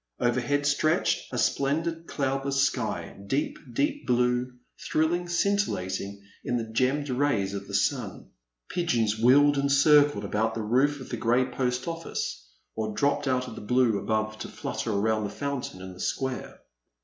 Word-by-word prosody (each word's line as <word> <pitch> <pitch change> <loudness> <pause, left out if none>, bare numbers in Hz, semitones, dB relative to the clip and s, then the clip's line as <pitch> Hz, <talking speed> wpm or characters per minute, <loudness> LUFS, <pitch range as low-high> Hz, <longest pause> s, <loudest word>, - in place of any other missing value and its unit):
Overhead 130 +4 +1
stretched 155 +4 +1
a 125 - -3
splendid 160 +7 0
cloudless 135 0 0
sky, 130 -5 -2
deep, 150 - -1
deep 290 0 -1
blue, 125 +1 +2 0.4
thrilling, 175 +3 +1
scintil 200 +4 +1
lating 95 +2 -5 0.2
in 120 - 0
the 115 - -1
gemmed 130 +6 0
rays 125 -8 +1
of 100 0 -5
the - - -4
sun. - - -1 0.4
Pigeons 115 -11 0
wheeled 140 +4 +5
and 140 0 +1
circled 145 -5 +5
about 110 +2 0
the 110 - -3
roof 135 +6 +2
of 130 - -9
the 120 - -3
grey 120 +3 +2
Post 125 -1 -1
OflSce 165 0 -3 0.4
or 110 -1 -3
dropped 145 0 +1
out 125 -1 +1
of - - -7
the - - -8
blue 120 -1 +2
above 110 0 -1
to - - -5
flutter 115 - -4
around 110 +1 +1
the 100 - -2
fountain 140 -10 -4
in 95 0 -8
the 90 - -14
square. 130 +4 -3
130 Hz, 160 wpm, -27 LUFS, 110-145 Hz, 0.4 s, wheeled